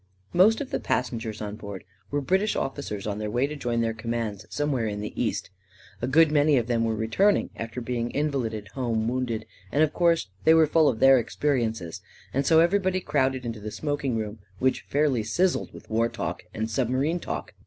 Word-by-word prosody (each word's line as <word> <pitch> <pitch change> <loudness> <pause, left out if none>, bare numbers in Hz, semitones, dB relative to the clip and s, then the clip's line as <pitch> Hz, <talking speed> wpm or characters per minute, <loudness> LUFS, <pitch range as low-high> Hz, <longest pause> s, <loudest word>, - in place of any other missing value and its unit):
Most 210 +7 +5
of 275 - -5
the - - 0
passengers 115 -4 -2
on 105 0 -5
board 100 -3 -8 0.3
were 145 0 -1
British 190 +9 +1
officers 135 -7 -3
on 105 -1 -3
their 105 0 -3
way 120 +5 +1
to 150 +2 -5
join 120 -4 -1
their 115 -1 0
commands 115 -2 -4
some 145 0 -1
where 120 -5 0
in 105 -1 -3
the 105 0 -5
east. 110 -4 -2 0.5
A 120 - -1
good 155 +3 +5
many 145 -1 +4
of 120 - +1
them 115 -1 +1
were 115 -1 0
re 110 0 -2
turning 200 - +2
after 115 +2 -5
having 120 0 -2
been - - -9
invalided 120 -8 -1
home 115 -3 -1
wounded, 120 -3 -2 0.3
and 150 - +3
of 155 - +1
course 170 - +2
they 160 - +6
were 160 -1 +6
full 155 0 +4
of 115 -4 -3
their 135 -1 +7
experiences, 115 - -1 0.3
and 135 +1 0
so 160 -1 +6
everybody 185 +1 +2
crowded 130 -7 0
into 115 -2 -4
the 105 +1 -5
smoking 140 -1 -2
room, 110 0 -4 0.2
which 130 0 +1
fairly 140 -5 +2
sizzled 175 - 0
with - - -13
*war 115 +1 +1
talk, - - -4
and 110 0 -2
submarine 130 +8 0
talk. - - -5
125 Hz, 205 wpm, -26 LUFS, 110-150 Hz, 0.5 s, their